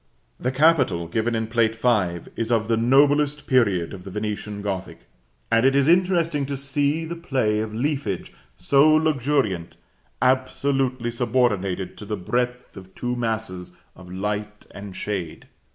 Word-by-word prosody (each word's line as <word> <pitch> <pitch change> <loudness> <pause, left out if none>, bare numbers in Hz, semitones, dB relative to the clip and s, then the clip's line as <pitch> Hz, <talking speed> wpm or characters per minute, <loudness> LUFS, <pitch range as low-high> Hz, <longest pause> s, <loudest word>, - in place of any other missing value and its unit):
The 125 - -1
capital, 130 - +3
given 115 +6 -1
in 110 0 -1
Plate 110 0 +1
V., 105 -8 +1
is 115 +1 -2
of 110 -2 +2
the 115 - +3
noblest 145 +5 +3
period 100 - +2
of 95 -2 -9
the 95 - -8
Venetian 105 0 -4
Gothic; 95 -2 -4 0.5
and 115 0 +4
it 135 +1 +4
is 140 0 +3
interesting 170 -5 +2
to 140 -1 -3
see 145 +3 -1
the 170 +1 -5
play 130 -10 0
of 110 0 -3
leafage 120 - -2 0.2
so 140 - +4
luxuriant, 140 - 0 0.4
absolutely 130 -1 +1
subordinated 110 -6 0
to 105 - -8
the 105 0 -3
breadth 125 +6 -2
of 95 -1 -13
two 125 0 -2
masses 110 -7 -3 0.2
of 90 -1 -13
light 105 +2 -4
and 100 -1 -9
shade. 95 -6 -4
115 Hz, 150 wpm, -23 LUFS, 100-135 Hz, 0.5 s, and